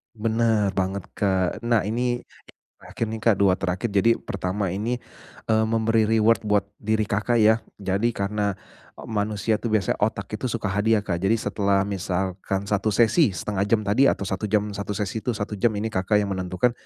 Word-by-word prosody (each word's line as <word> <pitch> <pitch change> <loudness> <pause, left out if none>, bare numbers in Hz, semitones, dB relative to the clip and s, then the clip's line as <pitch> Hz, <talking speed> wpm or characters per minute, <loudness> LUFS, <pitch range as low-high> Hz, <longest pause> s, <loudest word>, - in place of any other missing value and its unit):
Benar 110 -2 +1
banget, 95 +1 -2
Kak. 95 -1 0
Nah, 115 -2 +1
ini 120 +4 -1
yang - - -24 0.4
terakhir - - -4
nih, 110 - -4
Kak, 110 -1 +3
dua 95 -1 +3
terakhir. 95 +4 -2
Jadi 100 +3 +3
pertama 95 0 -3
ini, 110 +6 -1 0.6
eee, 110 0 +3
memberi 115 -1 +2
reward 115 +1 +3
buat 105 -1 +3 0.2
diri 110 +1 0
Kakak 105 +3 0
ya. 110 0 +5 0.2
Jadi 100 +4 -1
karena 100 0 -1 0.4
e - - -11
manusia 105 0 -1
tuh - - -3
biasa 100 - 0
otak 105 +2 -1
itu 130 - -2
suka 110 -4 -2
hadiah, 105 +1 +2
Kak. 90 -4 -2
Jadi 95 +5 +2
setelah 100 -3 +1
misalkan 95 0 -2
satu 105 +1 -1
sesi 110 -4 +4
1/2 100 +1 -2
jam 110 0 +2
tadi 105 +7 +3
atau - - +1
1 95 +2 -3
jam, 105 0 +1
satu 100 0 -4
sesi 105 +1 -2
itu 120 +1 -2
1 105 0 -4
jam, 120 +3 +3
ini 110 +2 -2
Kakak 95 +2 0
yang 100 - -3
menentukan. 95 +4 0
105 Hz, 185 wpm, -24 LUFS, 100-110 Hz, 0.6 s, ya